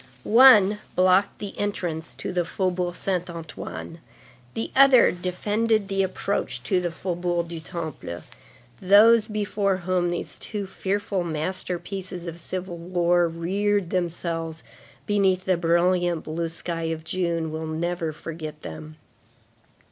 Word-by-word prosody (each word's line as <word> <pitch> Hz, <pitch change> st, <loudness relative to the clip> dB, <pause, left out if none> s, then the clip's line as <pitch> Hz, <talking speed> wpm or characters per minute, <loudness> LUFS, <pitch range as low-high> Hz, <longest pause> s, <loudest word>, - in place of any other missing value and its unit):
One 210 Hz, -4 st, +7 dB, 0.2 s
blocked 185 Hz, +2 st, +3 dB
the 205 Hz, -1 st, -7 dB
entrance 175 Hz, -6 st, -3 dB
to -, -, -5 dB
the 175 Hz, -1 st, +1 dB
Faubourg 180 Hz, 0 st, -1 dB
Saint 180 Hz, -2 st, -2 dB
Antoine; 165 Hz, 0 st, -7 dB, 0.6 s
the 225 Hz, -, -3 dB
other 270 Hz, -2 st, +7 dB
defended 205 Hz, +4 st, 0 dB
the 195 Hz, 0 st, +1 dB
approach 185 Hz, -9 st, -2 dB
to 180 Hz, +7 st, +1 dB
the 175 Hz, -, -1 dB
Faubourg 175 Hz, 0 st, -2 dB
du 170 Hz, -1 st, -5 dB
Temple; 160 Hz, -, -6 dB, 0.6 s
those 215 Hz, +4 st, +6 dB
before 205 Hz, -2 st, 0 dB
whom 180 Hz, -1 st, +1 dB
these 175 Hz, -, -4 dB
two 205 Hz, -2 st, -3 dB
fearful 195 Hz, 0 st, -2 dB
masterpieces 180 Hz, +2 st, -4 dB
of 170 Hz, 0 st, -6 dB
civil 185 Hz, 0 st, -5 dB
war 175 Hz, 0 st, +2 dB
reared 190 Hz, +3 st, -1 dB
themselves 165 Hz, -2 st, -3 dB, 0.4 s
beneath 190 Hz, -3 st, +2 dB
the 185 Hz, -, +3 dB
brilliant 175 Hz, 0 st, +2 dB
blue 165 Hz, +1 st, -3 dB
sky 165 Hz, 0 st, -4 dB
of 160 Hz, -1 st, -3 dB
June, 170 Hz, -2 st, -1 dB
will 160 Hz, 0 st, -4 dB
never 165 Hz, +1 st, -2 dB
forget 155 Hz, -1 st, -8 dB
them. 155 Hz, 0 st, -8 dB
180 Hz, 125 wpm, -25 LUFS, 165-195 Hz, 0.6 s, One